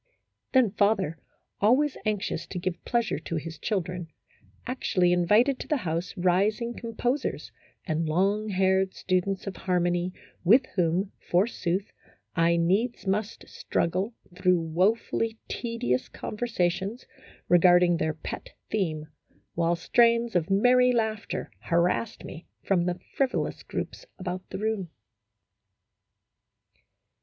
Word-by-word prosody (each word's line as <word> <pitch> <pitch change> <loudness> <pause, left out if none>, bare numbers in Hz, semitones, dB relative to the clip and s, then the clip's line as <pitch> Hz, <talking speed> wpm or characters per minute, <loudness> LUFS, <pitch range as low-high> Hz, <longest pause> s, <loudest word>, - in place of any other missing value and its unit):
Then 255 -6 +5
father, 200 -7 +1 0.4
aways 260 +7 +4
anxious 210 -2 -2
to 185 - -6
give 180 0 -3
pleasure 235 -2 0
to 170 - -5
his 160 +1 -5
children, 180 -4 -2 0.6
actually 185 -8 +1
invited 210 +10 +3
to - - -6
the 300 - +1
house 165 +2 -2
rising 200 +7 +1
composers 240 +4 -2 0.3
and 160 -2 -1
long 200 +6 +1
haired 190 0 +2
students 185 +1 -1
of 195 -2 -5
harmony 175 -1 0 0.3
with 235 +9 +6
whom, 180 +2 +1 0.2
forsooth, 185 0 0 0.4
I 170 0 +3
needs 200 +10 +1
must 205 +3 -2
struggle 185 +7 -1 0.2
through 180 -1 +3
woe 170 +6 +2
fully 225 0 -3
tedious 230 - -2
conversations 210 0 -2 0.4
regarding 175 0 +5
their 160 -1 -1
pet 155 - -7 0.2
theme, 160 -8 -1 0.5
while 170 0 +1
strains 235 +4 +3
of 175 0 +1
merry 250 +5 +5
laughter 220 -2 -2
harassed 175 +6 0
me 165 - -9 0.2
from 180 -3 +2
the 180 0 -2 0.2
frivolous 270 -2 0
groups - - -6
about 185 0 -5
the - - -5
room. 210 -3 -2
190 Hz, 115 wpm, -27 LUFS, 175-225 Hz, 0.6 s, with